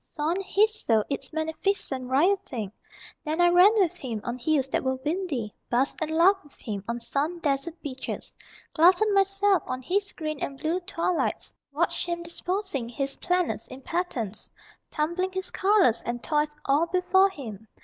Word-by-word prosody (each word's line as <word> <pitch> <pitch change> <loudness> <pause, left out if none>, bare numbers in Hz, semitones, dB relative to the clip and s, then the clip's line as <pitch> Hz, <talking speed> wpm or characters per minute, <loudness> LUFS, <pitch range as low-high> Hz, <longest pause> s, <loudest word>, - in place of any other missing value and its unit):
Saw 300 0 -2
in 360 +3 0
his 430 +3 +2
soul 220 -2 +3
its 275 -1 -3
magnificent 315 -4 -2
rioting 285 - +1 0.5
Then 310 +1 -2
I 350 0 +6
ran 355 +3 +7
with 380 -6 +2
him 235 -5 -4
on 240 +1 -4
hills 275 0 +1
that - - 0
were 260 0 0
windy, 290 - -3 0.2
Basked 255 +6 +1
and 315 - -1
laughed 360 +5 +4
with 290 - -18
him 205 -4 -5
on 235 +1 -2
sun 295 +8 -1
dazzled 310 +2 -1
beaches, 265 -2 -6 0.4
Glutted 365 +6 +5
myself 395 -1 +3
on 255 0 -4
his 400 +7 0
green 310 -3 -4
and 275 - -4
blue 325 +5 -1
twilights, 355 -1 -2 0.2
Watched - - 0
him 345 0 -2
disposing 345 - -3
his 275 +2 -2
planets 355 - 0
in 260 - -10
patterns, 255 - -2 0.4
Tumbling 345 +5 -1
his 375 0 -3
colors 385 - +3
and 240 0 -4
toys 300 -1 +1 0.2
all 290 +5 +3
before 370 +2 +4
him. 225 - -9
315 Hz, 165 wpm, -26 LUFS, 260-370 Hz, 0.5 s, ran